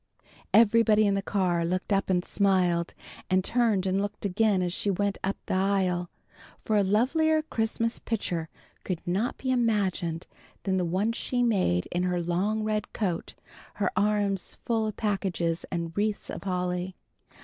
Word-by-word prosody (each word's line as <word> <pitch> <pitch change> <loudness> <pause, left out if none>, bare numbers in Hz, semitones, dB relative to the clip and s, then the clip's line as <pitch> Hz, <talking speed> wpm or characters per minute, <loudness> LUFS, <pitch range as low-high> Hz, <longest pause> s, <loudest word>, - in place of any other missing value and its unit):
Everybody 220 -1 +5
in 200 - +3
the 195 - 0
car 185 -4 0
looked 185 +4 -1
up 195 0 +1
and 180 -1 +1
smiled, 180 -4 +1 0.3
and 185 0 +3
turned 225 -4 +2
and 190 +1 +1
looked 205 0 -4
again 200 -1 +2
as 175 -1 -1
she 205 - -1
went 200 +1 0
up 195 +1 -1
the - - -2
aisle, 185 -2 +1 0.6
for 215 - +1
a 205 - +5
lovelier 310 - +2
Christmas 230 -3 -1
picture 175 -8 -3 0.3
could 180 -3 -2
not 195 +8 -1
be 260 - -2
imagined 200 -9 0 0.4
than 190 -1 0
the 180 - +1
one 190 +6 0
she 245 +1 -1
made 185 - +1
in 175 - 0
her 180 -1 0
long 185 +6 0
red 215 -1 -2
coat, 185 -7 -2 0.4
her 205 - 0
arms 200 -1 0
full 225 -2 +1
of 215 - -5
packages 190 -6 -1
and 170 -2 -4
wreaths 210 0 -1
of - - -7
holly. 180 0 -2
195 Hz, 160 wpm, -27 LUFS, 180-215 Hz, 0.6 s, Everybody